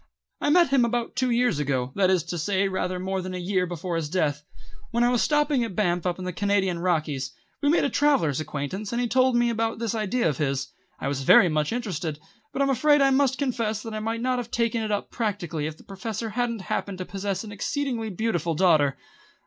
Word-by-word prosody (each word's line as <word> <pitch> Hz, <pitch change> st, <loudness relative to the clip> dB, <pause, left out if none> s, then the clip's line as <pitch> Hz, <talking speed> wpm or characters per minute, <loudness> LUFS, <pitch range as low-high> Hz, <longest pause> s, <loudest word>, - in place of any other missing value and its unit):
I -, -, +1 dB
met 340 Hz, 0 st, +5 dB
him 270 Hz, -2 st, +4 dB
about 235 Hz, 0 st, -1 dB
two 255 Hz, -1 st, +1 dB
years 240 Hz, -9 st, +2 dB
ago, 135 Hz, -3 st, -1 dB
that 190 Hz, -2 st, +2 dB
is 185 Hz, -4 st, +2 dB
to 170 Hz, +1 st, -4 dB
say 195 Hz, +4 st, +1 dB
rather 185 Hz, -1 st, -2 dB
more 190 Hz, +1 st, -2 dB
than 185 Hz, 0 st, -5 dB
a -, -, -4 dB
year 180 Hz, 0 st, 0 dB
before 175 Hz, 0 st, -4 dB
his 155 Hz, -3 st, -3 dB
death, 150 Hz, -4 st, 0 dB, 0.5 s
when 235 Hz, +1 st, +1 dB
I 240 Hz, -, +4 dB
was 245 Hz, -, +2 dB
stopping 295 Hz, -4 st, +2 dB
at 225 Hz, -6 st, -5 dB
Banff 180 Hz, -4 st, +1 dB
up 175 Hz, -, -1 dB
in 185 Hz, -, -6 dB
the 180 Hz, -, -3 dB
Canadian 195 Hz, -2 st, +1 dB
Rockies. 155 Hz, -7 st, -1 dB, 0.3 s
We 290 Hz, -, +2 dB
made 330 Hz, -, +3 dB
a 280 Hz, -, +2 dB
travellers' 265 Hz, -, +2 dB
acquaintance, 155 Hz, +7 st, -4 dB
and 235 Hz, -, -1 dB
he 245 Hz, -, +1 dB
told 255 Hz, +1 st, +3 dB
me 240 Hz, 0 st, +3 dB
about 225 Hz, 0 st, -1 dB
this 230 Hz, -1 st, -2 dB
idea 220 Hz, 0 st, 0 dB
of 150 Hz, -5 st, -1 dB
his. 135 Hz, -2 st, -1 dB, 0.3 s
I -, -, -3 dB
was 140 Hz, -1 st, -2 dB
very 175 Hz, +6 st, +6 dB
much 150 Hz, -1 st, 0 dB
interested, 180 Hz, -10 st, -3 dB, 0.3 s
but 275 Hz, -, 0 dB
I'm 275 Hz, -, +2 dB
afraid 295 Hz, +3 st, +4 dB
I 275 Hz, -1 st, +4 dB
must 265 Hz, -1 st, +2 dB
confess 230 Hz, -6 st, -1 dB
that 225 Hz, -, -6 dB
I 215 Hz, -, -3 dB
might 225 Hz, +1 st, -2 dB
not 255 Hz, 0 st, 0 dB
have 240 Hz, -1 st, -5 dB
taken 230 Hz, -1 st, 0 dB
it 215 Hz, -1 st, -2 dB
up 205 Hz, -, -2 dB
practically 175 Hz, -9 st, -2 dB
if 155 Hz, 0 st, -7 dB
the -, -, -17 dB
Professor 215 Hz, +3 st, -5 dB
hadn't 235 Hz, -1 st, -1 dB
happened 190 Hz, +1 st, -3 dB
to 185 Hz, -, -5 dB
possess 195 Hz, 0 st, -3 dB
an 215 Hz, -, -8 dB
exceedingly 235 Hz, +1 st, -2 dB
beautiful 175 Hz, -5 st, -1 dB
daughter. 155 Hz, -6 st, +3 dB
200 Hz, 230 wpm, -25 LUFS, 175-240 Hz, 0.5 s, very